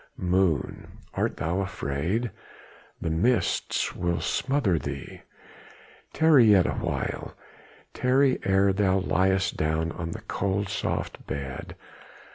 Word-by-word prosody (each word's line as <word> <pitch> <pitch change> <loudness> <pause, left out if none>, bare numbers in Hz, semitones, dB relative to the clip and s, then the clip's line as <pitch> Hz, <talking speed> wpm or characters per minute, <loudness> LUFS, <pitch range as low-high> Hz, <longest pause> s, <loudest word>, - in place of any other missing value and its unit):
Moon! 90 -5 0 0.2
art - - -1
not 85 +6 0
afraid? 95 - -2 0.7
the 80 - -2
mists 110 +9 +1
will 85 -1 -1
smother 130 - +1
thee! 70 -1 -7 0.9
Tarry 155 -6 +5
yet 100 -4 +6
awhile! - - -3 0.6
tarry 130 +1 +3
ere 95 0 +3
thou 95 -1 +2
layest 95 +2 +1
down 80 +1 0
on 85 -1 -5
the - - -6
cold, 100 0 -2
soft - - -3
bed! 65 -1 -5
95 Hz, 105 wpm, -26 LUFS, 80-100 Hz, 0.9 s, yet